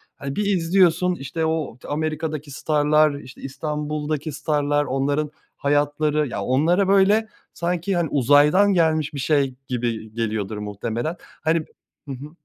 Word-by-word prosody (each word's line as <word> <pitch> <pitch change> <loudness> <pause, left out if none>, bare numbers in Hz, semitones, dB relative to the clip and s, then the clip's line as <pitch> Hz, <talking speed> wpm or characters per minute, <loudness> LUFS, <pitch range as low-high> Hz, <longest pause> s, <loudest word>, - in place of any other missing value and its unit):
hani, 140 0 -6
bir 210 - 0
izliyorsun, 180 -1 +3
işte, 160 +2 -3
o 160 -7 -2
Amerika'daki 155 -1 -3
starlar, 150 +1 +2
işte, 125 -2 -13
İstanbul'daki 150 +2 -3
starlar 145 0 0
onların 145 +3 -1 0.3
hayatları 145 +1 +1
ya, 110 -5 -4
onlara, 160 - +2
böyle, 200 +3 +4 0.3
sanki, 175 +2 -1
hani, 170 -4 0
uzaydan 145 +9 +4
gelmiş 160 -3 +2
bir 140 - -5
şey 135 -2 +1
gibi 115 -3 -3
geliyordur 110 -2 -2
muhtemelen. 110 - -3 0.3
Hani 160 +1 +2 0.5
hı - - -5
hı. 140 +4 -9
150 Hz, 130 wpm, -22 LUFS, 135-160 Hz, 0.5 s, böyle